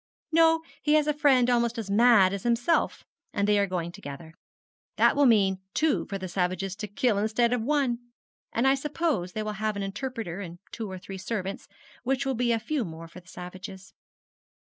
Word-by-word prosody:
'No, 325 0 +4 0.2
he 295 - +2
has 305 -1 +4
a 300 - +1
friend 275 -4 +4
almost 235 -1 +1
as 210 -3 -4
mad 210 -3 +6
as 200 - -3
himself, 240 - +1 0.3
and 200 0 +1
they 210 0 +4
are 200 - +2
going 175 -2 -3
together. 160 +1 -9 0.6
That - - +4
will 285 -1 +5
mean 195 -5 +3
two 310 -3 +2
for 195 - -3
the 190 -1 -5
savages 185 +1 -1
to 210 - -4
kill 215 0 +1
instead 230 +3 +2
of 245 - 0
one; 265 -2 +1 0.5
and 235 +4 +1
I 270 - +6
suppose 275 - -1
they 215 - -2
will 215 0 -3
have 215 -1 0
an 200 - -3
interpreter 210 -2 -4
and 175 -3 -7
two 220 -3 -5
or 190 - -6
three 190 +1 -8
servants, 195 0 -4 0.3
which 270 +2 0
will 270 - 0
be 240 0 +1
a 230 - +3
few 255 +4 -2
more 165 -3 -8
for 165 +2 -12
the 180 - -23
savages.' 185 +2 -9
215 Hz, 200 wpm, -27 LUFS, 190-255 Hz, 0.6 s, mad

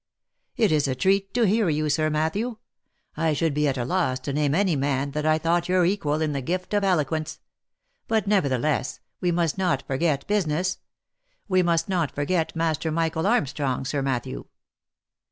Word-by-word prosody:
" - - -51
It 220 -7 +3
is 150 -2 +2
a 130 - -1
treat 195 +7 +1
to 245 - +3
hear 210 -1 +2
you, 155 0 0
Sir 155 +1 +1
Matthew. 160 +10 -1 0.6
I 160 -1 +1
should 155 +1 0
be 150 +1 +1
at 135 -1 0
a 120 - -1
loss 150 -4 0
to 140 +1 -4
name 145 0 +1
any 190 -3 +2
man 140 0 -1
that 150 +2 -2
I 155 0 +4
thought 170 +2 0
your 180 -1 +3
equal 160 -5 0
in 155 - 0
the 140 -1 -2
gift 180 +8 -3
of 205 -1 +2
eloquence. 160 -4 0 0.7
But, 220 -2 +1
nevertheless, 150 - 0 0.2
we 180 -2 +1
must 170 0 0
not 175 -8 0
forget 140 +1 0
business. 185 -3 0 0.7
We 185 -2 +3
must 170 -1 +1
not 175 -6 -1
forget 160 +4 -1
Master 160 -1 0
Michael 160 +2 0
Armstrong, 140 - 0
Sir 140 +2 -1
Matthew. 125 - -3
160 Hz, 180 wpm, -25 LUFS, 145-185 Hz, 0.7 s, I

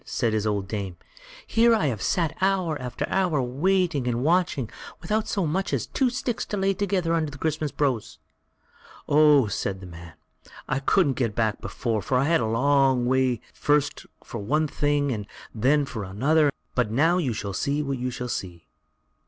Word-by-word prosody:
said 115 -3 -1
his 110 0 0
old 100 -2 -1
dame; 100 -4 -4 0.5
"here 230 +1 +4
have 225 - +3 0.2
I - - -11
sat 165 - 0
hour 190 -4 +1
after 125 -1 -4
hour 180 -6 +1
waiting 145 +2 +1
and 120 0 0
watching, 165 -6 +1 0.3
without 215 0 -1
so 195 -4 0
much 185 +6 -1
as - - 0
two 265 -2 +1
sticks 245 -2 -2
to 205 - -3
lay 195 0 +2
together 190 -4 0
under 160 -2 0
the 145 - -10
Christmas 155 0 -2
brose." 130 -7 -1 0.9
"Oh!" 150 -3 +5
said 100 -2 -3
the 95 - -10
man, 85 -2 -11 0.5
"I 135 - 0
couldn't 140 0 +2
get 115 -4 0
back 110 -3 0
before, 115 -3 -2
for 125 +7 0
I 130 - +3
had 165 +3 +3
to - - 0
go - - -2
a - - -1
long 135 0 +3
way 130 -2 +1
first 145 -1 0 0.2
for 115 - -7
one 150 +10 +1
thing, 145 -1 0
and 105 -4 -4 0.3
then 140 +6 +2
for 110 -6 -5
another; 140 +11 +2 0.2
but 125 -4 +1
now 160 +10 +3
you 140 -8 0
shall 100 -3 -4
see 145 +8 -1
what 135 -2 -3
you 125 +1 -2
shall 125 0 -5
see." 90 -7 -5
140 Hz, 190 wpm, -25 LUFS, 115-165 Hz, 0.9 s, Oh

